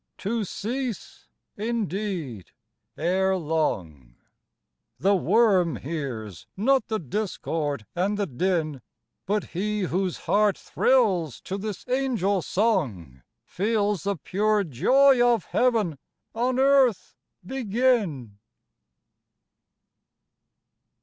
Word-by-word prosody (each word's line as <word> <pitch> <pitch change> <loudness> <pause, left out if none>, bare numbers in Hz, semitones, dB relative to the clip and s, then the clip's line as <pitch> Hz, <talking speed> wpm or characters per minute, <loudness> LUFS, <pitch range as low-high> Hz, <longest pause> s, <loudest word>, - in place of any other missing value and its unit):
to 220 +3 -2
cease, 235 +4 -5 0.3
indeed, 195 - -3 0.4
ere 190 +3 +1
long; 90 - -2 0.8
The 200 +2 +3
worm 190 -3 +3
hears 125 - -6
not 260 +4 +2
the 220 - -1
discord 155 - -3
and 195 +4 0
the 205 - 0
din; 155 -2 -1 0.5
But 210 +2 +1
he 210 +4 -2
whose 185 0 -1
heart 205 -1 +3
thrills 190 - +1
to 190 - -5
this 205 0 -5
angel 245 -7 0
song, 130 - -1 0.2
Feels 205 -1 0
the 200 +3 -1
pure 210 +6 +1
joy 255 - +4
of 240 -2 +2
heaven 215 - +1 0.3
on 245 +2 0
earth 265 -8 +3 0.3
begin! 210 - 0
195 Hz, 90 wpm, -25 LUFS, 160-225 Hz, 0.8 s, joy